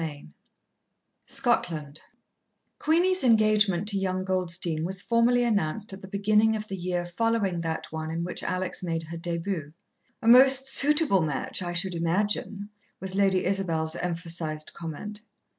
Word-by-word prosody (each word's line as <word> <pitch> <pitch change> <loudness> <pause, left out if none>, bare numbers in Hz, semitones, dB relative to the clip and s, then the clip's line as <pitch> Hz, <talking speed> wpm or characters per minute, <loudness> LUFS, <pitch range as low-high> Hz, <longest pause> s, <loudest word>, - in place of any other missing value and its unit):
IX 150 -3 -6 1.0
Scotland 155 - 0 0.8
Queenie's 355 +4 +2
engagement 215 -5 +3
to 200 -2 0
young 185 -1 -2
Goldstein 175 -3 -1
was 185 +2 -2
formally 240 +1 +2
announced 205 -2 -1
at 190 - -9
the 190 - -10
beginning 210 +3 +2
of 215 0 -5
the 195 - -5
year 180 -1 -3
following 195 -1 -1
that 165 -1 -3
one 160 0 -5
in 165 +1 -3
which 180 - -3
Alex 185 0 -2
made 165 -2 -3
her 165 +1 -8
début. 170 -2 -4 0.5
"A - - -5
most 265 +2 +7
suitable 285 - +4
match, 150 +1 -3
I 175 -1 -4
should 175 +2 0
imagine," 200 +4 -1 0.3
was 190 0 -2
Lady 195 -1 +2
Isabel's 170 -4 -1
emphasized 165 -3 -4
comment. 170 +6 -7
185 Hz, 140 wpm, -26 LUFS, 170-215 Hz, 1.0 s, most